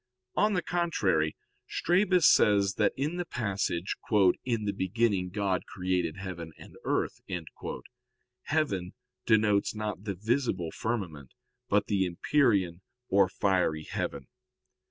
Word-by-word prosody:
On 210 0 +3
the 180 - 0
contrary, 100 - +1 0.3
Strabus 180 0 +2
says 100 -2 +5
that - - +4
in 150 +6 -1
the 175 - -2
passage, 100 - -2 0.5
"In 115 -4 -1
the 100 - +1
beginning 95 -1 0
God 95 -1 -1
created 90 -3 -1
heaven 85 -4 -6
and - - -13
earth," - - -1 1.2
heaven 100 - -1 0.3
denotes 105 -2 +3
not 105 -1 -4
the 100 -2 -2
visible 105 - -1
firmament, 90 - -4 0.3
but 105 +1 +3
the 95 -3 +1
empyrean 95 - +1 0.3
or 95 -1 +4
fiery 90 -5 +1
heaven. 70 -2 -4
100 Hz, 115 wpm, -29 LUFS, 90-120 Hz, 1.2 s, says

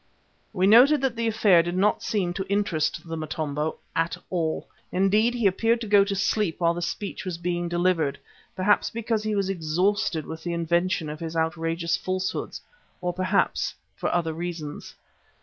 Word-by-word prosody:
We 185 -3 +1
noted 250 +9 +7
that 265 -3 0
the 230 0 -1
affair 210 -6 +5
did 175 +2 -3
not 205 +3 +2
seem 185 -5 -1
to 190 +1 -4
interest 175 -6 0
the 165 - -4
Motombo 155 -1 -3 0.2
at 165 +1 0
all. 165 -3 -1 0.2
Indeed, 210 +6 +2
he 235 -3 -1
appeared 225 +5 +3
to - - -3
go 200 -1 +6
to 200 0 -2
sleep 195 -2 0
while 170 -1 +3
the 175 - -5
speech 195 +4 -4
was 185 -4 -4
being 175 0 -2
delivered, 175 -4 +1 0.4
perhaps 195 +2 +2
because 225 -1 -1
he 215 0 -1
was 200 -2 0
exhausted 180 0 0
with 160 0 -7
the 175 - -2
invention 170 0 0
of 150 0 -6
his 165 0 -5
outrageous 165 +1 0
falsehoods, 185 0 -3 0.4
or 180 0 -2
perhaps 185 +1 0 0.2
for - - -2
other 165 -2 0
reasons. 165 -3 -6
180 Hz, 170 wpm, -25 LUFS, 165-205 Hz, 0.4 s, noted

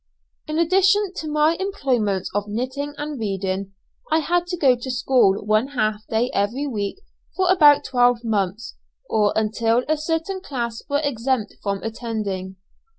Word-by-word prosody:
In 305 0 -2
addition 385 +3 +3
to 315 - -4
my 305 +2 +3
employments 250 - -1
of 205 +1 -1
knitting 260 +7 -4
and 295 -2 -5
reading, 195 -2 -3 0.4
I 315 - +4
had 345 +2 0
to 355 0 -3
go 270 -6 +4
to 245 +2 -7
school 245 -6 +2
one 215 +4 +2
half 215 -6 -2
day 230 +3 0
every 225 +8 0
week 210 - -3 0.4
for 375 -1 +1
about 295 -6 +6
twelve 245 -2 +2
months, 210 -1 -2 0.3
or 210 -2 +2
until 225 +2 +1
a 310 +1 +1
certain 325 +5 -2
class 235 -8 -4
were 285 +1 +1
exempted 255 -4 -1
from 200 -1 -3
attending. 215 -5 -4
245 Hz, 155 wpm, -22 LUFS, 215-300 Hz, 0.4 s, about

